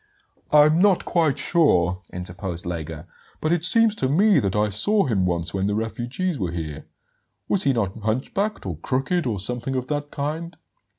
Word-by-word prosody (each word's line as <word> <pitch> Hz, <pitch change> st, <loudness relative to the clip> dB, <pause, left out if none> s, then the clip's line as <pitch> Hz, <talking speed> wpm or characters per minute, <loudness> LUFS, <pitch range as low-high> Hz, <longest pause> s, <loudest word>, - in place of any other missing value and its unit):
"I'm 150 Hz, +3 st, +6 dB
not 200 Hz, -3 st, +3 dB
quite 160 Hz, -6 st, +1 dB
sure," 90 Hz, -, +2 dB
interposed 90 Hz, 0 st, -5 dB
Lega; 80 Hz, -2 st, -5 dB, 0.3 s
"but 155 Hz, -, -1 dB
it 170 Hz, -2 st, +1 dB
seems 225 Hz, +3 st, +5 dB
to 130 Hz, -, 0 dB
me 195 Hz, +8 st, +4 dB
that 100 Hz, -1 st, -1 dB
I 105 Hz, 0 st, +2 dB
saw 200 Hz, -, +2 dB
him 95 Hz, -7 st, +1 dB
once 85 Hz, -1 st, -2 dB
when 95 Hz, 0 st, 0 dB
the 105 Hz, -, 0 dB
refugees 120 Hz, +10 st, -3 dB
were 90 Hz, -4 st, -1 dB
here. 80 Hz, -3 st, -6 dB, 0.6 s
Was 195 Hz, -, 0 dB
he 140 Hz, -, +3 dB
not 110 Hz, -3 st, -2 dB
hunchbacked, 130 Hz, -, -2 dB
or 90 Hz, -5 st, -4 dB
crooked, 135 Hz, -, -1 dB
or 105 Hz, -5 st, -2 dB
something 125 Hz, +6 st, -3 dB
of 130 Hz, -1 st, -1 dB
that 145 Hz, -1 st, -2 dB
kind?" 160 Hz, +4 st, -4 dB
125 Hz, 175 wpm, -23 LUFS, -, 0.6 s, I'm